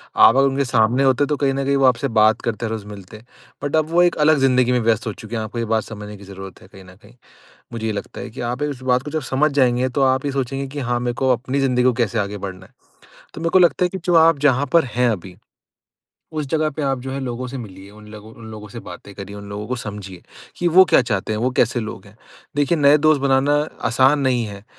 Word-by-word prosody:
आप 115 Hz, -, +6 dB
अगर 135 Hz, 0 st, +4 dB
उनके 135 Hz, +1 st, 0 dB
सामने 120 Hz, +1 st, +2 dB
होते 135 Hz, +1 st, +3 dB
हैं -, -, 0 dB
तो 150 Hz, -, 0 dB
कहीं 135 Hz, -2 st, +1 dB
न 135 Hz, +1 st, -2 dB
कहीं 140 Hz, +1 st, +1 dB
वो 135 Hz, -, +3 dB
आपसे 125 Hz, +2 st, +2 dB
बात 110 Hz, +1 st, +4 dB
करते 115 Hz, 0 st, -3 dB
हैं 110 Hz, -, -3 dB
रोज़ 110 Hz, -2 st, -5 dB
मिलते 100 Hz, 0 st, -11 dB
हैं। 110 Hz, -, -19 dB, 0.4 s
बट 145 Hz, +1 st, -1 dB
अब 155 Hz, 0 st, +1 dB
वो 175 Hz, +2 st, +4 dB
एक 175 Hz, -, +2 dB
अलग 155 Hz, -1 st, +4 dB
जिंदगी 125 Hz, -2 st, +3 dB
में 125 Hz, -, +2 dB
व्यस्त 115 Hz, -1 st, 0 dB
हो 110 Hz, -, -2 dB
चुके 110 Hz, +3 st, -9 dB
हैं 110 Hz, -, -2 dB
आपको 115 Hz, +2 st, -6 dB
ये 115 Hz, -, -1 dB
बात 110 Hz, -, +1 dB
समझने 105 Hz, -1 st, -9 dB
की 100 Hz, -, -14 dB
जरूरत 95 Hz, -1 st, -10 dB
है -, -, -16 dB
कहीं 95 Hz, 0 st, -15 dB
न 90 Hz, 0 st, -16 dB
कहीं। 110 Hz, +4 st, -18 dB, 0.6 s
मुझे 110 Hz, -1 st, -5 dB
ये 110 Hz, -, -1 dB
लगता 100 Hz, -, -7 dB
है 125 Hz, -, -7 dB
कि 120 Hz, +4 st, -9 dB
आप 125 Hz, +4 st, -4 dB
इस 145 Hz, -3 st, -4 dB
बात 125 Hz, 0 st, +1 dB
को 150 Hz, -, -7 dB
जब 155 Hz, -1 st, -2 dB
समझ 145 Hz, +3 st, +2 dB
जाएँगे 130 Hz, -2 st, +2 dB
तो 135 Hz, +3 st, -2 dB
आप 130 Hz, 0 st, +2 dB
ये 140 Hz, -, -1 dB
सोचेंगे 135 Hz, 0 st, -3 dB
कि 145 Hz, +2 st, -7 dB
हाँ, 120 Hz, -2 st, -1 dB
मेरे 120 Hz, 0 st, -2 dB
को 130 Hz, +2 st, -1 dB
अपनी 130 Hz, +3 st, -3 dB
ज़िंदगी 125 Hz, -2 st, +1 dB
को 125 Hz, 0 st, +3 dB
कैसे 115 Hz, -1 st, -1 dB
आगे 105 Hz, 0 st, -3 dB
बढ़ना 95 Hz, -1 st, -8 dB
है। -, -, -23 dB, 0.6 s
तो -, -, -8 dB
मेरे 165 Hz, 0 st, -1 dB
को 185 Hz, -, +5 dB
लगता 180 Hz, 0 st, +3 dB
है -, -, +2 dB
कि 190 Hz, +1 st, -6 dB
जो 175 Hz, -, +1 dB
आप 165 Hz, -1 st, +5 dB
जहाँ 140 Hz, -1 st, +2 dB
पर 170 Hz, -3 st, +5 dB
हैं 125 Hz, +1 st, 0 dB
अभी, 90 Hz, -3 st, -6 dB, 1.0 s
उस 155 Hz, -2 st, -3 dB
जगह 155 Hz, 0 st, 0 dB
पे 155 Hz, -, -3 dB
आप 135 Hz, -2 st, -1 dB
जो 130 Hz, +1 st, -6 dB
है 135 Hz, -, -4 dB
लोगों 125 Hz, -1 st, -4 dB
से 135 Hz, +1 st, -7 dB
मिलिए 100 Hz, -4 st, -10 dB
उन 105 Hz, +1 st, -15 dB
लोगों 110 Hz, +1 st, -12 dB
उन 115 Hz, -, -14 dB
लोगों 105 Hz, -1 st, -10 dB
से 115 Hz, +4 st, -9 dB
बातें 90 Hz, +1 st, -11 dB
कारिए, 100 Hz, +1 st, -9 dB
उन 100 Hz, 0 st, -10 dB
लोगों 105 Hz, +1 st, -6 dB
को 125 Hz, -, -2 dB
समझिए 100 Hz, -5 st, -8 dB, 0.3 s
कि 175 Hz, -, 0 dB
वो 185 Hz, +3 st, +7 dB
क्या -, -, +6 dB
चाहते 110 Hz, -3 st, -2 dB
हैं, 105 Hz, -, -2 dB
वो 125 Hz, +2 st, +1 dB
कैसे 120 Hz, +1 st, +2 dB
लोग 110 Hz, -1 st, -7 dB
हैं। 100 Hz, +2 st, -18 dB, 0.4 s
देखिए 145 Hz, +3 st, +1 dB
नए 145 Hz, +1 st, +5 dB
दोस्त 155 Hz, -1 st, +3 dB
बनाना 140 Hz, +1 st, +2 dB, 0.3 s
आसान 130 Hz, +5 st, +3 dB
नहीं 125 Hz, -3 st, +1 dB
है। 100 Hz, 0 st, -10 dB
125 Hz, 275 wpm, -20 LUFS, 110-140 Hz, 1.0 s, वो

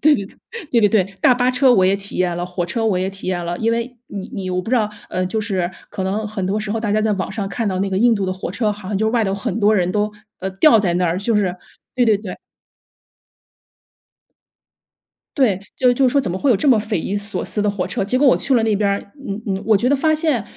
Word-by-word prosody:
对 305 Hz, +1 st, +5 dB
对 200 Hz, -8 st, -2 dB
对， 465 Hz, -, -12 dB
对 235 Hz, -, +4 dB
对 210 Hz, -, +5 dB
对， 200 Hz, -2 st, +3 dB, 0.2 s
大 -, -, +5 dB
巴 245 Hz, +1 st, +2 dB
车 255 Hz, 0 st, +4 dB
我 190 Hz, -6 st, +4 dB
也 190 Hz, +1 st, +3 dB
体 200 Hz, 0 st, -6 dB
验 180 Hz, -1 st, 0 dB
了， 175 Hz, -, -2 dB
火 180 Hz, -1 st, -3 dB
车 225 Hz, +6 st, -2 dB
我 205 Hz, -5 st, +1 dB
也 185 Hz, +1 st, -1 dB
体 195 Hz, -1 st, -7 dB
验 175 Hz, -2 st, -1 dB
了。 175 Hz, +1 st, -3 dB
因 225 Hz, -, +1 dB
为 235 Hz, +2 st, -2 dB
你 200 Hz, -2 st, -6 dB
你 185 Hz, -1 st, -4 dB
我 180 Hz, 0 st, 0 dB
不 185 Hz, -, -9 dB
知 255 Hz, -, +3 dB
道 215 Hz, -3 st, +1 dB, 0.2 s
呃， 185 Hz, 0 st, -1 dB
就 220 Hz, +4 st, -2 dB
是 190 Hz, -5 st, -2 dB, 0.2 s
可 190 Hz, -, -5 dB
能 200 Hz, +3 st, -2 dB
很 210 Hz, -3 st, -4 dB
多 195 Hz, +3 st, 0 dB
时 210 Hz, -1 st, -4 dB
候 225 Hz, -, -2 dB
大 215 Hz, -2 st, -2 dB
家 215 Hz, +1 st, +2 dB
在 215 Hz, -1 st, +1 dB
网 190 Hz, -1 st, -3 dB
上 200 Hz, -1 st, -3 dB
看 225 Hz, +2 st, -3 dB
到 185 Hz, -, -2 dB
那 195 Hz, +1 st, 0 dB
个 190 Hz, -, -2 dB
印 235 Hz, +3 st, +4 dB
度 200 Hz, -3 st, -2 dB
的 185 Hz, -, -1 dB
火 185 Hz, -1 st, -5 dB
车， 210 Hz, +2 st, 0 dB
好 205 Hz, -2 st, -9 dB
像 205 Hz, -, -1 dB
就 220 Hz, -, +1 dB
是 -, -, +1 dB
外 235 Hz, -, +2 dB
头 195 Hz, -2 st, 0 dB
很 205 Hz, +2 st, -3 dB
多 215 Hz, +1 st, +4 dB
人 180 Hz, -2 st, +1 dB
都， 210 Hz, 0 st, 0 dB, 0.3 s
呃， 190 Hz, +1 st, -3 dB
吊 220 Hz, +4 st, +5 dB
在 180 Hz, -4 st, 0 dB
那 180 Hz, 0 st, +1 dB
儿， 165 Hz, -, 0 dB
就 215 Hz, +2 st, 0 dB
是 190 Hz, -4 st, +1 dB, 0.4 s
对 250 Hz, -, +3 dB
对 220 Hz, -3 st, +4 dB
对。 205 Hz, -3 st, -8 dB, 3.0 s
对， 240 Hz, -, +3 dB, 0.2 s
就 250 Hz, -1 st, +4 dB
就 260 Hz, +1 st, +3 dB
说 280 Hz, +3 st, +2 dB
怎 215 Hz, -, -3 dB
么 180 Hz, -, -2 dB
会 270 Hz, +8 st, +1 dB
有 230 Hz, -, +5 dB
这 215 Hz, -, -1 dB
么 255 Hz, -5 st, +6 dB
匪 210 Hz, -2 st, -2 dB
夷 195 Hz, +5 st, -2 dB
所 205 Hz, +1 st, -4 dB
思 210 Hz, -, 0 dB
的 210 Hz, -, +2 dB
火 195 Hz, -3 st, -3 dB
车。 195 Hz, +1 st, -2 dB
结 250 Hz, +6 st, 0 dB
果 290 Hz, -, +4 dB
我 260 Hz, -, +6 dB
去 275 Hz, -, +1 dB
了 230 Hz, -, +3 dB
那 220 Hz, -2 st, +2 dB
边 205 Hz, 0 st, +1 dB
儿， 200 Hz, -, 0 dB, 0.3 s
嗯 200 Hz, +2 st, -4 dB
嗯， 195 Hz, -1 st, -2 dB
我 220 Hz, -2 st, +5 dB
觉 235 Hz, +5 st, +1 dB
得 285 Hz, -, +3 dB
发 310 Hz, +3 st, +2 dB
现， 305 Hz, -7 st, 0 dB
205 Hz, 305 characters per minute, -19 LUFS, 190-230 Hz, 3.0 s, 么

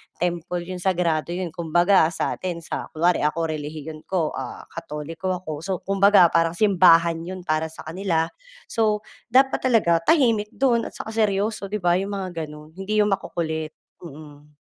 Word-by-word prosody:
temple 175 Hz, 0 st, -2 dB
yun, 180 Hz, +1 st, -6 dB
sagrado 175 Hz, -2 st, 0 dB
yun, 180 Hz, -3 st, -3 dB
'kumbaga 175 Hz, +1 st, +3 dB
sa 165 Hz, -, -2 dB
atin 175 Hz, -2 st, -4 dB
sa -, -, -5 dB
kunwari 175 Hz, +3 st, +2 dB
ako 160 Hz, +2 st, 0 dB
relihiyon 155 Hz, +1 st, -7 dB
ko, 170 Hz, -5 st, 0 dB
ah, 130 Hz, -2 st, -6 dB
Katoliko 165 Hz, +3 st, -4 dB
ako, 175 Hz, -3 st, -7 dB
so 190 Hz, +4 st, -5 dB
kumbaga 195 Hz, -2 st, +5 dB
parang 165 Hz, 0 st, +2 dB
simbahan 170 Hz, -4 st, +5 dB
yun 185 Hz, -1 st, -6 dB
para 155 Hz, -1 st, 0 dB
sa 160 Hz, -, -11 dB
kanila. 165 Hz, 0 st, -1 dB, 0.4 s
So 215 Hz, -2 st, +1 dB, 0.2 s
dapat 265 Hz, +3 st, +3 dB
talaga 170 Hz, -9 st, +3 dB
tahimik 230 Hz, -9 st, +3 dB
do'n, 240 Hz, -4 st, +2 dB
at -, -, -11 dB
saka 220 Hz, -, -6 dB
seryoso, 210 Hz, -1 st, 0 dB
'di 205 Hz, -1 st, -4 dB
ba? 175 Hz, +1 st, +3 dB
Yung 200 Hz, +1 st, -3 dB
mga 175 Hz, -5 st, -4 dB
gano'n, 150 Hz, +1 st, -12 dB
hindi 210 Hz, +2 st, +1 dB
yung 205 Hz, -, 0 dB
makukulit. 160 Hz, -4 st, -3 dB, 0.2 s
Mm. 150 Hz, -2 st, -13 dB
175 Hz, 165 wpm, -23 LUFS, 160-195 Hz, 0.4 s, kumbaga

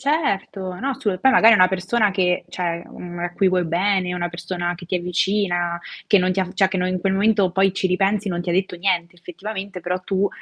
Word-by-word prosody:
Certo. 200 Hz, -, -1 dB
No, 275 Hz, +3 st, -2 dB
assolu 230 Hz, -8 st, -2 dB
poi 265 Hz, +7 st, +4 dB
magari 230 Hz, -1 st, +7 dB
è -, -, +6 dB
una 185 Hz, -, +6 dB
persona 190 Hz, +3 st, 0 dB
che, 180 Hz, -2 st, +1 dB
cioè, 170 Hz, -2 st, -3 dB
mhmm, 175 Hz, 0 st, -9 dB
a 175 Hz, 0 st, -3 dB
cui 190 Hz, +1 st, +2 dB
vuoi 180 Hz, -1 st, +1 dB
bene, 180 Hz, +2 st, 0 dB
una 175 Hz, -1 st, -2 dB
persona 175 Hz, 0 st, -4 dB
che 175 Hz, -, -12 dB
ti 185 Hz, -, -3 dB
è 180 Hz, -, +1 dB
vicina, 175 Hz, -1 st, 0 dB, 0.3 s
che 205 Hz, -, +5 dB
non 185 Hz, 0 st, +1 dB
ti 190 Hz, -, -1 dB
ha 185 Hz, -, 0 dB
cioè, 195 Hz, 0 st, +3 dB
che 190 Hz, -, -3 dB
no 180 Hz, 0 st, 0 dB
in 185 Hz, -1 st, -2 dB
quel 190 Hz, +1 st, 0 dB
momento 200 Hz, -2 st, +3 dB
poi 195 Hz, +1 st, +2 dB
ci 190 Hz, -, 0 dB
ripensi, 195 Hz, +2 st, +1 dB
non 175 Hz, -1 st, -2 dB
ti 175 Hz, -, -6 dB
ha 175 Hz, -, +1 dB
detto 185 Hz, 0 st, 0 dB
niente 175 Hz, -1 st, -1 dB
effettivamente, 190 Hz, +2 st, -7 dB
però, 180 Hz, +2 st, -2 dB
tu 195 Hz, +1 st, 0 dB
185 Hz, 240 wpm, -21 LUFS, 175-200 Hz, 0.3 s, magari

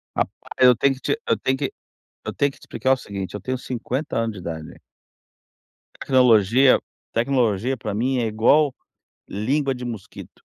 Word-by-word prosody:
Rapaz, -, -, 0 dB, 0.3 s
eu 125 Hz, -1 st, +7 dB
tenho 135 Hz, +4 st, +2 dB
que 130 Hz, -, -16 dB
te 455 Hz, -, -1 dB
eu -, -, +2 dB
tenho 130 Hz, 0 st, 0 dB
que -, -, -3 dB, 0.5 s
eu -, -, -4 dB
tenho 140 Hz, -1 st, +1 dB
que -, -, -19 dB
te -, -, -32 dB
explicar 130 Hz, -, 0 dB
o 135 Hz, -, +4 dB
seguinte, 100 Hz, -5 st, -6 dB
eu 105 Hz, -, -4 dB
tenho 130 Hz, 0 st, -3 dB
50 125 Hz, +3 st, -4 dB
anos 115 Hz, -1 st, -1 dB
de 100 Hz, -, -9 dB
idade. 80 Hz, -3 st, -7 dB, 1.2 s
Tecnologia 125 Hz, 0 st, +4 dB, 0.3 s
tecnologia 120 Hz, -1 st, +1 dB
pra 110 Hz, -4 st, -5 dB
mim 125 Hz, +4 st, 0 dB
é 115 Hz, -, 0 dB
igual 125 Hz, +7 st, +3 dB, 0.5 s
língua 135 Hz, +7 st, 0 dB
de 125 Hz, -1 st, -7 dB
mosquito, 115 Hz, -5 st, -9 dB
125 Hz, 170 wpm, -23 LUFS, 110-130 Hz, 1.2 s, eu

